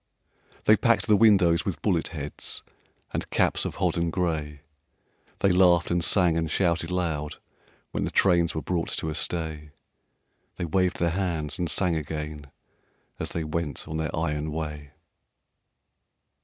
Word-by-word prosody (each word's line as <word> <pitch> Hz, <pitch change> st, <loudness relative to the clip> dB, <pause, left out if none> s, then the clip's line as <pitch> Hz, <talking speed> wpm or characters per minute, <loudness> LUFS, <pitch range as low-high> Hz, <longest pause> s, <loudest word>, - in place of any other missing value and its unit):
They -, -, +6 dB
packed -, -, +2 dB
the 105 Hz, -, +5 dB
windows 100 Hz, -6 st, +5 dB
with 80 Hz, -6 st, -4 dB
bullet 90 Hz, -6 st, +1 dB
heads 75 Hz, -4 st, -5 dB, 0.5 s
And -, -, -3 dB
caps -, -, +1 dB
of -, -, -4 dB
hodden 85 Hz, 0 st, 0 dB
gray; 80 Hz, -5 st, -2 dB, 0.8 s
They 100 Hz, -, +4 dB
laughed 90 Hz, -2 st, +4 dB
and 85 Hz, -1 st, +1 dB
sang 90 Hz, -1 st, +4 dB
and 80 Hz, -1 st, -1 dB
shouted 85 Hz, -2 st, +1 dB
loud 80 Hz, -5 st, -2 dB, 0.6 s
When -, -, -2 dB
the -, -, -1 dB
trains 85 Hz, -4 st, +3 dB
were 80 Hz, -, -3 dB
brought 85 Hz, -2 st, -1 dB
to 80 Hz, -, -2 dB
a -, -, -3 dB
stay; 80 Hz, -2 st, -3 dB, 0.9 s
They -, -, -3 dB
waved 90 Hz, +2 st, +1 dB
their 85 Hz, -1 st, +1 dB
hands 85 Hz, -5 st, -1 dB
and 85 Hz, -2 st, -1 dB
sang 90 Hz, -4 st, +1 dB
again 75 Hz, -1 st, -5 dB, 0.7 s
As -, -, -3 dB
they 85 Hz, -, -3 dB
went 75 Hz, -3 st, -3 dB
on 80 Hz, -, -4 dB
their 80 Hz, -1 st, -2 dB
iron 75 Hz, -1 st, -1 dB
way. 75 Hz, -2 st, -5 dB
85 Hz, 150 wpm, -26 LUFS, 75-90 Hz, 0.9 s, They